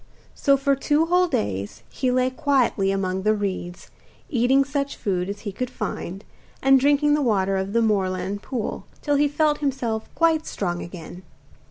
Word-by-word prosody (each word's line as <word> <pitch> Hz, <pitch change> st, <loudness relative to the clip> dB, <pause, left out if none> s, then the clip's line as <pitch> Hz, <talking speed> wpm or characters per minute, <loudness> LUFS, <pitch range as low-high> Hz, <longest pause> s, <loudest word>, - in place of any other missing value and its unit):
So 275 Hz, -1 st, +3 dB
for 275 Hz, 0 st, +2 dB
two 295 Hz, +3 st, +2 dB
whole 360 Hz, +2 st, +3 dB
days 100 Hz, -, -3 dB
he 255 Hz, -, -2 dB
lay 255 Hz, +1 st, +2 dB
quietly 255 Hz, -8 st, +1 dB
among 190 Hz, -1 st, -1 dB
the 215 Hz, +2 st, +2 dB
reeds, 185 Hz, -3 st, -4 dB, 0.4 s
eating 265 Hz, +1 st, +3 dB
such 280 Hz, 0 st, -2 dB
food 185 Hz, -3 st, -2 dB
as 205 Hz, 0 st, -5 dB
he 205 Hz, -, -4 dB
could 250 Hz, +5 st, -4 dB
find, 200 Hz, -4 st, -5 dB, 0.4 s
and 270 Hz, 0 st, +5 dB
drinking 290 Hz, +2 st, +3 dB
the 300 Hz, -, +2 dB
water 195 Hz, -6 st, +1 dB
of 190 Hz, +1 st, -2 dB
the 230 Hz, 0 st, +3 dB
moorland 195 Hz, -2 st, 0 dB
pool, 240 Hz, -3 st, -4 dB, 0.2 s
till 290 Hz, -1 st, +2 dB
he 290 Hz, +1 st, +4 dB
felt 295 Hz, +1 st, +1 dB
himself 255 Hz, -6 st, -2 dB
quite 325 Hz, -1 st, +2 dB
strong 175 Hz, -3 st, -3 dB
again. 175 Hz, 0 st, -9 dB
235 Hz, 170 wpm, -23 LUFS, 195-280 Hz, 0.4 s, and